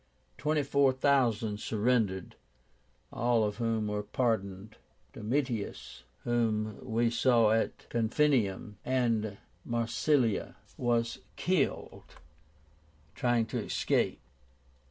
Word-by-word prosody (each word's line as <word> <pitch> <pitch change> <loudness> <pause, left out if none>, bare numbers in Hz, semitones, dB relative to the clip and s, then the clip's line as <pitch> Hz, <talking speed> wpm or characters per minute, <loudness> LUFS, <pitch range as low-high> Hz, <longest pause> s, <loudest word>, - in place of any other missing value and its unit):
Twenty 150 0 +1
four 140 -1 +3
thousand 120 -6 +1
surrendered, 110 -4 0 0.8
all 120 -1 +2
of 105 -1 -2
whom 115 -2 0
were 105 0 -1
pardoned. 105 -2 -2 0.4
Domitius, 115 - -3 0.2
whom 110 -3 0
we 115 -1 +1
saw 120 -2 +4
at 110 0 -1
Corfinium 115 -4 +1
and 115 -5 0 0.3
Massilia, 115 +1 0 0.2
was 115 -1 0 0.2
killed 180 -6 -1 1.0
trying 120 -2 +1
to - - -3
escape. - - 0
115 Hz, 90 wpm, -30 LUFS, 105-125 Hz, 1.0 s, saw